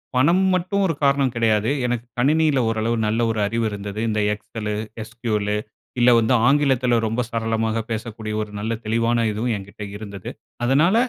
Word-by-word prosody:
பணம் 170 +9 +4
மட்டும் 185 +3 0
ஒரு 165 - +1
காரணம் 140 -2 +3
கெடையாது 110 0 +2
எனக்கு 120 -1 -2
கணினியில 150 +2 +3
ஓரளவு 115 +1 0
நல்ல 110 +2 0
ஒரு 110 - -2
அறிவு 115 +2 -1
இருந்தது. 100 0 -6
இந்த 105 - 0
எக்ஸெலு, 105 0 -5 0.3
எஸ்கியூலு 110 -2 -2 0.4
இல்ல 120 +1 +6
வந்து 115 +3 +2
ஆங்கிலத்தில 135 -4 +3
ரொம்ப 115 +3 -1
சரளமா 115 -1 0 0.2
பேசக்கூடிய 110 -1 -4
ஒரு 105 - -5
நல்ல 110 +2 -2
தெளிவான 115 +1 +1
இதுவும் 115 +3 -1
என்கிட்ட 100 +1 -9
இருந்தது. 100 -3 -8 0.4
அதனால 150 - +4
115 Hz, 150 wpm, -22 LUFS, 110-130 Hz, 0.4 s, இல்ல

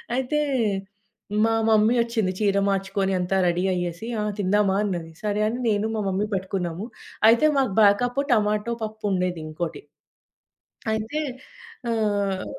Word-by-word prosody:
అయితే 265 +3 0 1.1
మా 225 - +2 0.2
మమ్మీ 220 +2 +4
వచ్చింది. 230 -5 0
చీర 200 -2 +2
మార్చుకొని, 195 0 0
అంతా 180 +2 0
రెడీ 175 +1 +1
అయ్యేసి, 175 +4 -3 0.3
"తిందామా?" 200 0 +2
అన్నది. 175 -5 -3
సరే 210 0 0
అని 235 +3 -2
నేను, 210 0 +1
మా 220 - -1
మమ్మీ 195 +2 0
పట్టుకున్నాము. 185 -1 -3 0.4
అయితే 235 +6 +5
మాకు 265 -5 +2
బ్యాకప్పు 245 +7 +3
టొమాటో 210 +1 +1
పప్పుండేది. 195 -6 -2
ఇంకోటి. 155 0 -4 1.1
అయితే 220 +8 -2 0.7
ఆహ్ 205 -4 0
205 Hz, 120 wpm, -24 LUFS, 185-220 Hz, 1.1 s, అయితే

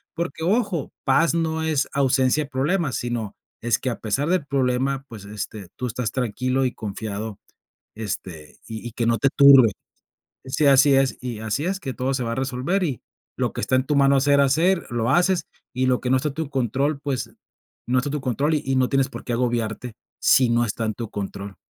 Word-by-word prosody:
porque 170 -1 -4
ojo, 200 - 0
paz 165 0 +3
no 160 -1 -1
es 155 -3 +1
ausencia 135 +1 +2
de - - -17
problemas, 150 +2 0
sino 120 -4 -3 0.3
es 120 0 +1
que, 130 - -2
a 120 - -4
pesar 135 +8 -1
del 180 -5 +1
problema, 135 0 0
pues, 105 -4 -10
este, 105 -1 -6
tú 125 - -3
estás 120 -1 -3
tranquilo 130 +2 0
y 125 - -1
confiado, 105 0 -5 0.6
este, 90 -7 -6
y 110 +1 -6
y - - -7
que 115 - -1
no 115 0 +3
te 135 - +3
turbe. 135 -5 +8 0.7
Sí, 130 +3 0
así 140 +1 +6
es, 135 -1 +2
y 120 -4 -5
así 110 +6 -2
es, 190 +2 -1
que 135 - -4
todo 130 +2 -1
se 130 -2 -1
va 115 -1 -2
a - - -4
resolver 135 +9 -1
y 140 - -2 0.4
lo - - -1
que - - -4
está - - +1
en 130 - 0
tu 150 - 0
mano 140 0 +4
hacer, 140 +1 +4
hacer, 165 +7 +2
lo 120 -1 0
haces, 180 +1 +2 0.3
y 130 0 0
lo 125 -1 +2
que 125 - -2
no 130 - +5
está 150 +4 -1
en - - -8
tu 160 -3 -3
control, 135 +3 0
pues, 140 -4 -3 0.6
no 125 +1 +2
está 140 +3 -3
en - - -5
tu 150 - -1
control, 140 +5 0
y 135 -3 -1
no 130 -1 +2
tienes 135 -1 +2
por - - -8
qué - - -4
agobiarte, 120 -1 -2 0.3
si 130 -2 +4
no 120 0 +2
está 115 +1 -3
en 110 -1 -2
tu 115 -3 -6
control. 100 -1 -6
130 Hz, 215 wpm, -23 LUFS, 115-145 Hz, 0.7 s, turbe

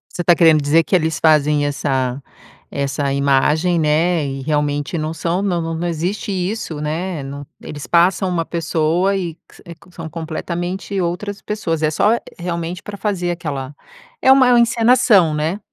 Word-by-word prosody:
Você 175 - -2
tá 175 - +5
querendo 160 -3 +5
dizer 150 +3 +3
que - - +1
eles 160 -3 0
fazem 150 -2 +3
essa 135 -2 -1 0.5
essa 140 0 -2
imagem, 150 +5 +2
né, 160 +1 +2
e 135 0 -5
realmente 145 +3 -1
não 155 0 -3
são 170 +3 -1
não 170 -4 -1
não 170 +2 -2
existe 175 +6 -3
isso, 185 -3 -3
né. 160 +2 -3
Não 140 +1 -7 0.2
Eles 145 -1 -8
passam 180 +2 +3
uma 170 -2 -1
pessoa 165 +3 0
e 175 -4 -3
que 170 - -24
s - - -17
eh, 170 - -9
que 180 - -21
são 165 -2 -7
completamente 175 +4 -4
outras 195 +4 -3
pessoas. 165 -7 -3
É 155 - +2
só, 210 +9 +2 0.2
realmente, 170 +1 -4
pra 205 -1 -8
fazer 195 -4 -2
aquela 145 -5 -5 0.5
é 265 - +5
uma 255 -2 +6
encenação, 230 -7 +4
né? 155 +6 -1
165 Hz, 170 wpm, -19 LUFS, 150-180 Hz, 0.5 s, uma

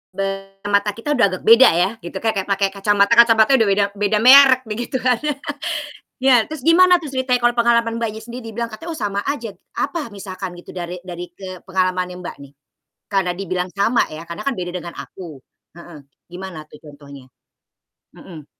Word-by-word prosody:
Be 195 0 -4
mata 205 0 +1
kita 230 +6 -4
udah 250 -7 +4
agak 185 - -6
beda 230 +3 +7
ya 180 +3 +2
gitu, 175 +2 -10
kek 225 - +2
kek 195 - -3
pakai 195 -1 0
kacamata 200 +1 +1
kacamata 230 +2 +6
udah 220 - +3
beda 200 +1 +2
beda 205 +1 +1
merek 265 0 +8
begitu 235 +4 -5
kan. 250 -2 +2 1.0
Ya, 255 -3 +4
terus 310 -2 -7
gimana 360 +1 +6
tuh 295 -5 -9
ceritanya 255 -1 +1
kalau 240 0 +2
pengalaman 235 -1 +2
Mbaknya, 220 -1 -3
sendiri 235 +1 -9
dibilang 235 +2 -3
katanya, 230 +10 -9
"Oh, 320 - -6
sama 200 -2 -2
aja." 235 -6 -4 0.2
Apa 305 -9 -3
misalkan 190 -2 -7
gitu 175 - -12
dari 180 0 -6
dari 175 0 -7
ke 185 0 -10
pengalamannya 185 -1 -2
Mbak, 180 - -8
nih? 140 0 -14 0.5
Karena 195 -3 0
dibilang 185 -1 -3
sama 200 +6 +1
ya, 155 +2 -9
karena 170 0 -7
kan 275 -1 -1
beda 175 -1 -4
dengan 170 -1 -6
aku 165 -7 -10 0.4
heeh, 170 -2 -12 0.3
gimana 180 -4 -8
tuh 150 - -15
contohnya? 140 -3 -13 0.9
Mhm. 155 -5 -12
200 Hz, 180 wpm, -20 LUFS, 180-235 Hz, 1.0 s, merek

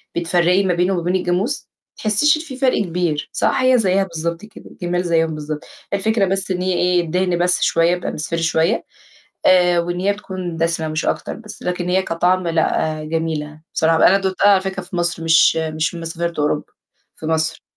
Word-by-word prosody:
بتفرّقي 175 +2 +2
ما 185 -2 +1
بينه 180 +3 +1
وما 175 - -1
بين 180 +2 0
الجاموس؟ 185 +9 -1
ما - - -72
بتحسّيش 225 +9 +3
إن - - -5
في 270 -5 -8
فرق 260 -1 +2
كبير 170 -4 -2
صح؟ - - +1
هي 255 0 +4
زيّها 195 -3 +2
بالضبط 170 +2 -4
كده، 215 - -15
الجِمال 175 0 -2
زيّهم 165 -2 +1
بالضبط، 150 0 -5 0.3
الفكرة 200 +1 +1
بس 190 0 -1
إن 180 - -1
هي 185 0 0
إيه 180 0 +2
الدِهن 180 +1 0
بس 180 +1 +2
شوية 165 +1 +3
يبقى 180 0 -2
مصفِر 165 +2 -3
شوية 165 +5 +1 0.6
آآ، 180 -1 +5
وإن 175 +1 -2
هي 200 +2 +1
تكون 185 -4 -6
دَسِمة 165 -1 0
مش 155 +1 -2
أكتر، - - -2
بس 215 -2 -11
لكن 180 0 -2
هي 190 +1 +3
كطعم 180 +1 0
لأ، 160 -1 0
جميلة 155 -1 -3
بصراحة 160 0 +2
ب - - 0
أنا 195 - +6
دوقتها 190 +1 +1
على 195 -2 +5
فكرة 190 0 -4
في 180 0 -9
مصر 170 -1 -1
مش 165 0 +5
مش 160 +1 -2
لمّا 165 - -6
سافرت 170 0 -3
أوروبا، 150 0 0 0.5
في - - -9
مصر، 160 0 -1
175 Hz, 200 wpm, -19 LUFS, 165-190 Hz, 0.6 s, أنا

